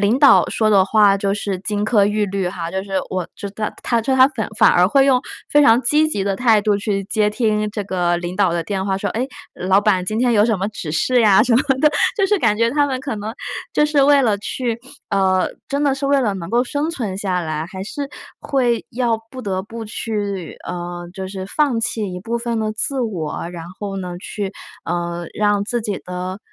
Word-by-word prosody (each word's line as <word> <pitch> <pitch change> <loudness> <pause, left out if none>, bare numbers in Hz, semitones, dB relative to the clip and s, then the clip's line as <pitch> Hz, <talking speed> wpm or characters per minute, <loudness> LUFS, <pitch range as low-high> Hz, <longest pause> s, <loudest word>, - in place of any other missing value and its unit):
领 210 +6 +2
导 280 -2 +6
说 215 -1 +1
的 195 -2 +5
话 205 -1 +4
就 195 0 0
是 200 -2 -3
金 205 +1 -2
科 215 -2 +4
玉 210 0 +1
律 195 -2 -2
哈， 170 -2 -5
就 190 +1 -2
是 195 -1 -10 0.2
我 185 -2 -3
知 200 - -6
道 215 +1 -3
他 235 -1 +1
就 265 +4 0
他 260 - +8
反 230 -7 -4
反 - - +7
而 180 +1 +4
会 270 +5 +4
用 260 -2 +4 0.3
非 295 0 +5
常 230 -1 +6
积 305 +5 +3
极 200 -9 -2
的 195 -1 0
态 225 -2 +4
度 205 0 +2
去 200 -1 -2
接 210 +1 +1
听 215 -2 0
这 205 -1 -4
个 175 -2 0
领 175 +1 -4
导 190 -3 +2
的 170 -1 -1
电 190 +2 -2
话， 190 -1 0
说： - - -2
“诶， 250 +4 -2 0.3
老 190 +2 +2
板 190 -4 +2
今 215 +4 -2
天 245 -1 +2
有 210 -1 +4
什 225 -3 +1
么 195 - -1
指 170 -7 -6
示 245 +9 +2
呀？” 210 -1 +6
什 240 - +2
么 250 - +4 0.2
的。 300 - +5 0.3
就 395 - +3
是 415 +1 +2
感 210 - +2
觉 230 +1 +2
他 290 +1 +2
们 260 -2 -3
可 265 -5 -4
能， 215 +3 -5 0.4
就 300 - +3
是 295 -2 +3
为 285 0 +5
了 215 -4 +2
去 235 +2 -3 0.3
呃， 190 -2 +2 0.2
真 280 +1 -1
的 280 -2 +2
是 275 0 -3
为 280 -1 +3
了 215 -5 +1
能 170 -3 -6
够 240 +2 +2
生 285 +4 -2
存 215 - -4
下 185 -3 -1
来， 155 -1 -3
还 190 0 -7
是 280 +7 -5 0.3
会 245 -4 0
要 235 -2 0
不 255 -1 -8
得 190 -2 -2
不 225 +2 -8
去 205 -4 -4
呃， 175 0 -5
就 190 0 -6
是 190 -1 -6
放 265 -1 +1
弃 215 -4 -2
一 180 - -6
部 235 +3 -3
分 235 -1 -2
的 215 0 -1
自 265 +5 -1
我， 170 -8 -3
然 170 -2 -7
后 200 -2 -4
呢 180 -2 -5
去 195 0 -5 0.3
呃， 170 0 -3
让 205 -1 +1
自 240 +2 -2
己 210 -3 -3
的 180 +1 -5
210 Hz, 250 characters per minute, -20 LUFS, 190-240 Hz, 0.4 s, 他